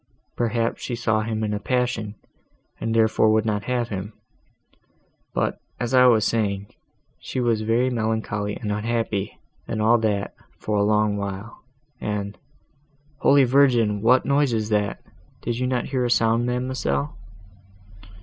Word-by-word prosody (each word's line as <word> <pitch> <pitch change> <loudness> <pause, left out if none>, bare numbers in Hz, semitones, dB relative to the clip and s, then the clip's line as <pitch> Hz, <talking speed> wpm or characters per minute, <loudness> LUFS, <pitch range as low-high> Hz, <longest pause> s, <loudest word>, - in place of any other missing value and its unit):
Perhaps 115 -1 -1
she 120 - -3
saw 110 -2 +1
him 110 0 -2
in 105 -1 -1
a 105 - -2
passion, 120 -2 -1 0.6
and 115 0 -2
therefore 110 -1 +4
would 110 0 +3
not 105 -2 -1
have 120 -2 -1
him. 100 +1 -5 1.2
But, - - -1 0.2
as 120 +1 -2
I 125 0 +7
was 110 -3 +4
saying, 100 -3 -1 0.5
she - - -4
was 115 -3 +1
very 115 +4 +1
melancholy 110 -3 -2
and 105 -3 -4
unhappy, 110 -1 -2 0.3
and 110 - -3
all 115 +2 +4
that, 105 -3 -1 0.2
for 105 - -3
a 100 - +3
long 105 0 +2
while, 100 +2 -6 0.4
and—Holy 140 +7 -2
Virgin! 120 -6 +3
what 125 +4 +4
noise 140 -2 +2
is 110 -1 -1
that? 105 -2 -1 0.4
did 120 +1 -2
not 125 -2 0
you - - -9
hear 130 -2 +1
a - - 0
sound, 115 0 +2
ma'amselle?" 125 - -1
115 Hz, 145 wpm, -23 LUFS, 105-125 Hz, 1.2 s, I